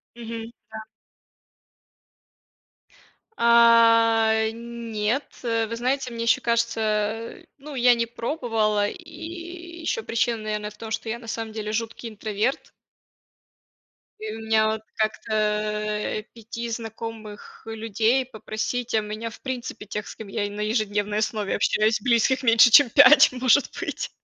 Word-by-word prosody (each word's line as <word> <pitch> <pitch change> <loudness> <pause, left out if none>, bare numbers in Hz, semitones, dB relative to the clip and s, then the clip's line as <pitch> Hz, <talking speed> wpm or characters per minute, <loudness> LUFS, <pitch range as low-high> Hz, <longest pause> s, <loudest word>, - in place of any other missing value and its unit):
Мгм, 230 -1 -7 0.2
да. 220 0 -7 2.6
А, 230 -1 +5 0.2
нет. 235 +2 -3 0.2
Э, 230 -2 0
вы 230 +1 -5
знаете, 255 +1 -1
мне 230 0 -4
ещё 235 - +3
кажется, 225 -2 -1 0.2
ну, 285 +1 -10
я 245 -1 +5
не 235 0 -1
пробовала. 225 -4 -1
И 345 - -9
ещё 395 +8 -2
причина, 230 - -1
наверное, 210 -1 -3
в 210 - -17
том, 220 +1 -8
что 220 +1 -3
я 225 +2 -3
на 235 - -13
самом 225 -1 -4
деле 215 -1 -4
жуткий 230 +1 -4
интроверт. 215 +3 -2 1.5
И 215 0 -5
у 225 - -8
меня 220 0 +2
вот 220 0 -2
как-то, 220 +1 -2
а, 210 0 -1
5 230 +1 -7
знакомых 225 -2 -8
людей 225 +3 0
попросить, 235 +1 -4
а 220 - +4
меня, 215 +2 -5
в - - -14
принципе, 250 -5 -6
тех, 210 +1 -5
с - - -8
кем 220 - -10
я 205 +1 -2
и 205 - -3
на 205 +1 -7
ежедневной 210 -1 -1
основе 215 -2 -1
общаюсь, 215 +1 +1
близких 245 +4 +2
меньше, 230 0 +6
чем 255 +1 +7
5, 285 +3 +7
может 255 +2 +3
быть. - - -4
225 Hz, 140 wpm, -24 LUFS, 215-235 Hz, 2.6 s, чем